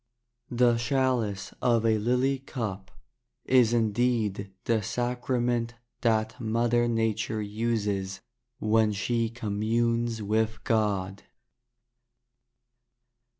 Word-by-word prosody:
The 120 -1 +3
chalice 120 -6 0
of 115 -2 +2
a 110 -1 +3
lily 125 +4 +1
cup 110 -8 -5 0.6
Is 125 -3 +4
indeed 110 -3 0
the 115 -2 +1
sacrament 120 0 -1 0.3
That 110 -2 +1
Mother 120 +1 +1
Nature 110 -1 -1
uses 105 -3 -2 0.4
When 110 0 +2
she 115 +3 0
communes 115 +1 -1
with 110 +2 0
God. 100 -4 0
115 Hz, 85 wpm, -27 LUFS, 105-120 Hz, 0.6 s, Is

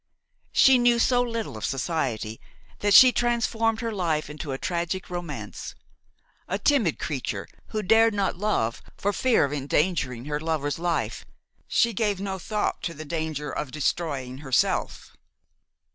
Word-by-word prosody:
She 265 -1 +6
knew 240 0 +4
so 245 +1 +3
little 230 - -3
of 110 - -8
society 130 -6 -2 0.4
that 205 -1 +3
she 255 -1 +10
transformed 230 -2 0
her 230 -1 -2
life 165 -7 -1
into 150 -1 -6
a 135 - -2
tragic 175 +2 -3
romance; 175 -1 -6 0.7
a - - -1
timid 250 - +2
creature, 140 -4 -4 0.2
who 215 -1 -3
dared 225 +3 +5
not 195 -2 0
love 175 - -1 0.2
for 205 +1 0
fear 250 - +3
of 140 - -4
endangering 140 -3 0
her 150 0 -2
lover's 155 -2 -2
life, 175 -1 -1 0.4
she 235 0 +2
gave 205 -2 0
no 190 -1 -3
thought 210 +4 -2
to 170 - -4
the 155 +1 -8
danger 155 -2 -3
of 150 - -4
destroying 140 -3 -2
herself. 135 -4 -1
175 Hz, 145 wpm, -26 LUFS, 150-220 Hz, 0.7 s, she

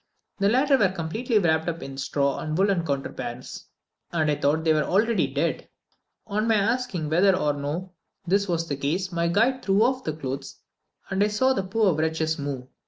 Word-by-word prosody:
The 200 0 +3
latter 270 +4 +3
were 200 - +4
completely 205 +7 -1
wrapped 160 -4 +2
up 165 0 -5
in 135 0 -7
straw 140 +1 -1
and 155 0 -3
woollen 195 -2 +2
counterpanes, 130 -4 -5 0.5
and 155 -3 +1
I - - +1
thought 150 +3 +1
they 160 -1 +4
were 155 - +2
already 205 -3 +2
dead. 145 +5 -2 0.6
On 215 +2 -1
my 225 - +4
asking 215 -5 0
whether 180 +5 +4
or 150 -5 +1
no 150 +6 -4 0.3
this 200 +3 +1
was 165 -2 -1
the 140 - -3
case, 175 +8 -1
my 170 -1 0
guide 235 +9 +2
threw 195 +2 +3
off 255 +2 +1
the 155 - -2
clothes, 135 -3 -6 0.5
and 195 +1 +2
I - - +3
saw 260 +6 +2
the 225 - -1
poor 195 0 +1
wretches 160 0 -1
move. 140 -3 -4
170 Hz, 190 wpm, -25 LUFS, 150-205 Hz, 0.6 s, were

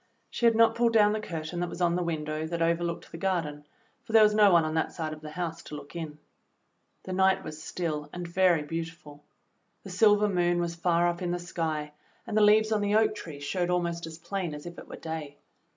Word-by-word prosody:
She 235 - +2
had 230 - +4
not 225 0 +5
pulled 235 0 +2
down 210 -2 +5
the 215 - -1
curtain 165 -3 -5
that 175 0 -1
was 170 - -8
on 175 -1 +2
the 180 - 0
win 165 -3 -2
dow 155 +1 -3
that 170 +1 -3
overlooked 170 0 -1
the 165 - -8
garden, 160 -6 -2 0.4
for 225 - -9
there 220 -1 +8
was 210 0 +5
no 210 -2 +6
one 170 -2 +5
on 155 - -2
that 160 - 0
side 155 -2 -4
of 155 - -10
the 155 - -8
house 165 0 -4
to 150 - -9
look 145 +2 -10
in. 160 -3 -6 0.9
The 185 - -5
night 190 +1 +3
was 155 0 -8
still 155 -3 -4
and 175 -1 -6
very 175 -2 +3
beautiful. 165 -2 -7 0.6
The 195 - -9
silver 210 +2 +4
moon 175 -2 +1
was 170 -1 -1
far 170 0 +2
up 175 +1 -2
in 180 - -2
the 175 - 0
sky 160 -4 -3 0.3
and 225 -3 -4
the^ 215 - +4
leaves 215 +1 +5
on 215 -1 +2
the 205 +1 +1
oak 220 0 +4
tree 165 -9 -8
showed 175 +5 -2
almost 170 -2 -1
as 160 0 -9
plain 175 -2 -4
as 150 - -10
if 175 0 -8
it - - -12
were - - -8
day. 155 -3 -6
170 Hz, 240 wpm, -28 LUFS, 160-190 Hz, 0.9 s, there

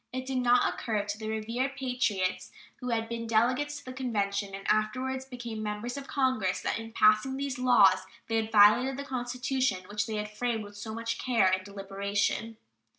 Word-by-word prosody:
It 255 0 -4
did 260 -1 -1
not 245 0 +4
occur 215 -4 -2
to 205 0 -4
the 215 - -5
revered 230 +5 -2
patriots 210 -9 -1 0.3
who 250 -2 -5
had 225 -1 0
been 230 0 -4
delegates 255 +6 +1
to 285 - -12
the 255 - -7
Convention, 200 -6 -2
and 195 - -8
afterwards 255 +5 0
became 240 -4 -6
members 210 +3 -4
of 280 -1 -7
Congress, 255 -9 +1
that - - -1
in 225 0 -8
passing 215 +5 +4
these 275 -2 -3
laws 195 -7 +5 0.2
they 225 - 0
had 220 0 -1
violated 225 +6 +6
the 280 - -4
Constitution 255 -5 -1
which 205 0 -2
they 220 - -3
had 210 0 -4
framed 235 -1 -1
with 205 0 -11
so 220 +2 -6
much 230 0 -3
care 230 -7 +3
and 185 0 0
deliberation. 200 +3 -2
225 Hz, 190 wpm, -29 LUFS, 210-255 Hz, 0.3 s, violated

